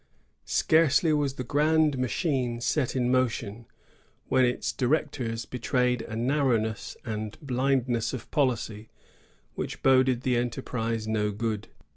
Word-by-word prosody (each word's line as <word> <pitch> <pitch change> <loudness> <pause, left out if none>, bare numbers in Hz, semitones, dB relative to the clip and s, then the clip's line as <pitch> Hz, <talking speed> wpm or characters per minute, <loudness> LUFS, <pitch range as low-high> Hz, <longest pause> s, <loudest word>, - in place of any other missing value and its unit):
Scarcely 160 0 +3
was 145 -3 0
the 130 - -4
grand 150 +3 +2
machine 130 -2 -1
set 130 +2 0
in 125 -1 +1
motion, 115 -3 -1 0.6
when 130 -1 +4
its 125 - -1
directors 125 -4 -1
betrayed 125 -1 0
a 110 -1 -7
narrowness 115 -4 0
and 110 -2 -4
blindness 130 -4 0
of 130 -4 -7
policy 115 -6 -1 0.6
which - - -5
boded 130 -2 +4
the 125 -1 +1
enterprise 115 -2 -2
no 105 -1 0
good. 105 0 -3
125 Hz, 120 wpm, -27 LUFS, 115-135 Hz, 0.6 s, when